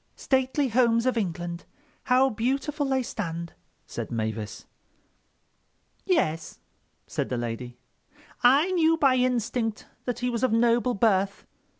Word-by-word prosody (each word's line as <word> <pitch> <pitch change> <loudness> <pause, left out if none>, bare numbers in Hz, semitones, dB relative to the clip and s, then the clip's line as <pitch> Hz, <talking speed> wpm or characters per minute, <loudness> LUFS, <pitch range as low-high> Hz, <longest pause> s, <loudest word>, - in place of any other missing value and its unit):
"'Stately 265 +1 +1
homes 230 0 +3
of 255 - +2
England—how 230 - -1
beautiful 275 +6 -1
they 265 -1 +1
stand,'" 170 -7 -5 0.3
said - - -6
Mavis. 110 -1 -4 1.4
"Yes," 165 - 0 0.5
said - - -3
the 125 - -1
lady. 120 +1 -5 0.6
"I 275 +9 +5
knew 330 -2 +3
by 270 -4 +4
instinct 240 -3 0 0.2
that 245 -2 -2
he 250 0 -1
was 235 -1 -2
of 255 - +3
noble 235 +2 +3
birth." 200 -2 +1
240 Hz, 115 wpm, -26 LUFS, 175-265 Hz, 1.4 s, I